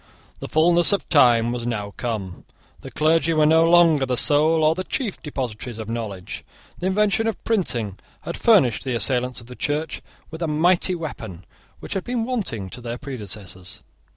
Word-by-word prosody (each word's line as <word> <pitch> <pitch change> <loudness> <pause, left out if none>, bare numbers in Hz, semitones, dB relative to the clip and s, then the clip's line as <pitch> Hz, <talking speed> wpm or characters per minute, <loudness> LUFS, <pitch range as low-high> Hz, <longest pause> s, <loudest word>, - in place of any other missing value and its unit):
The - - -6
fulness 170 +3 +4
of 200 - -1
time 120 -6 +4
was 120 -1 -4
now 105 -4 -4
come. 105 -7 -5 0.4
The - - -10
clergy 160 +2 +1
were 155 -1 +4
no 160 +2 +4
longer 165 -4 +5
the 130 -1 -1
sole 155 +4 +4
or 155 +1 +4
the 185 +3 -4
chief 220 0 -3
depositories 125 -5 -5
of 110 -1 -7
knowledge 105 -6 -5 0.4
The 180 - -2
invention 210 +2 +1
of 225 - -4
printing 120 - -2 0.2
had - - -5
furnished 175 - +3
the 130 -2 -2
assailants 125 +2 0
of - - -15
the 125 +1 -11
Church 150 +3 -3 0.3
with 160 +1 -8
a 165 - 0
mighty 175 +4 +2
weapon 110 - -7 0.4
which - - -6
had 195 - -2
been 240 -2 -2
wanting 200 - -3
to 125 - -9
their 120 0 -5
predecessors. 105 -8 -8
145 Hz, 180 wpm, -22 LUFS, 115-170 Hz, 0.4 s, longer